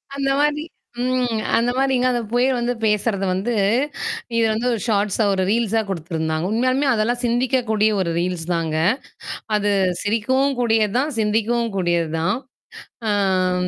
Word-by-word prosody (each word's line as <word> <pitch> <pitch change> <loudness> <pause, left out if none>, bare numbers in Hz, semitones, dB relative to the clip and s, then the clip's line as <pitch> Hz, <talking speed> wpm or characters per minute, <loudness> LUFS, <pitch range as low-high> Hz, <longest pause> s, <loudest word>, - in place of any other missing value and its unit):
அந்த 275 -1 -1
மாரி 295 +1 +1 0.4
ம். 250 -3 0 0.2
அந்த 235 +2 +1
மாரிங்க 265 -2 +2
அந்த 240 -1 0
புயல் 250 +2 +2
வந்து 240 +1 0
பேசுறது 210 -2 +1
வந்து 200 +6 -1 0.8
இது 230 - +3
வந்து 230 +3 -1
ஒரு 225 - -2
ஷார்ட்ஸா 210 0 +1
ஒரு 190 -1 0
ரீல்ஸா 225 0 +1
குடுத்துருந்தாங்க. 160 -2 -2
உண்மையாலுமே 255 +5 +1
அதெல்லாம் 235 +2 0
சிந்திக்கக்கூடிய 235 -3 +1
ஒரு 170 -2 -1
ரீல்ஸ் 175 -2 -2
தாங்க. 160 -2 -1 0.8
அது 205 0 0 0.3
சிரிக்கவும் 260 +6 +1
கூடியது 225 -3 +2
தான், 290 +4 0
சிந்திக்கவும் 225 +2 0
கூடியது 170 -3 +1
தான். 185 +7 +1 0.7
அம் 185 -3 +1
220 Hz, 135 wpm, -21 LUFS, 190-245 Hz, 0.8 s, இது